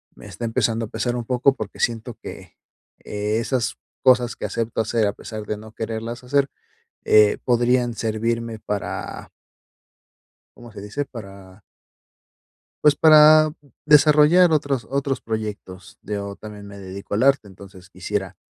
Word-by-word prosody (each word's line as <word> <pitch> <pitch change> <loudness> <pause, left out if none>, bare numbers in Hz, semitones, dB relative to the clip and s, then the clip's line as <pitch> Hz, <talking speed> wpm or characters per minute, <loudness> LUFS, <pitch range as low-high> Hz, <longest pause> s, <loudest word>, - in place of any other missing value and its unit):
me - - -14
está 120 - -6
empezando 115 -1 0
a - - -10
pesar 115 +2 -2
un 120 -1 -4
poco 130 +3 +2
porque 110 -5 -7
siento 115 0 -2
que - - -10 0.4
e 105 +1 -2
esas 115 -1 -1 0.3
cosas 125 -2 +4
que - - -6
acepto 115 -1 -3
hacer 110 -1 0
a 100 - -1
pesar 110 0 -8
de 105 - -3
no 110 +1 -12
quererlas 115 +2 -5
hacer, 140 +2 +1 0.6
eh, 105 -1 +5
podrían 120 0 +2
servirme 115 +1 -2
para 105 -2 -5 1.3
¿cómo 120 -1 -13
se 105 - -10
dice?, 105 +8 -4
para 100 -4 -12 1.2
pues, 150 -1 +6
para 155 0 +7 0.3
desarrollar 150 +4 +6
otros 140 -6 0
otros 140 0 -2
proyectos, 105 -4 -6
yo 100 -1 -5
también 105 -1 -10
me 100 - -11
dedico 100 +1 -8
al 110 - +1
arte, 135 -5 +3
entonces, 95 -1 -14
quisiera - - -4
115 Hz, 145 wpm, -22 LUFS, 105-130 Hz, 1.3 s, para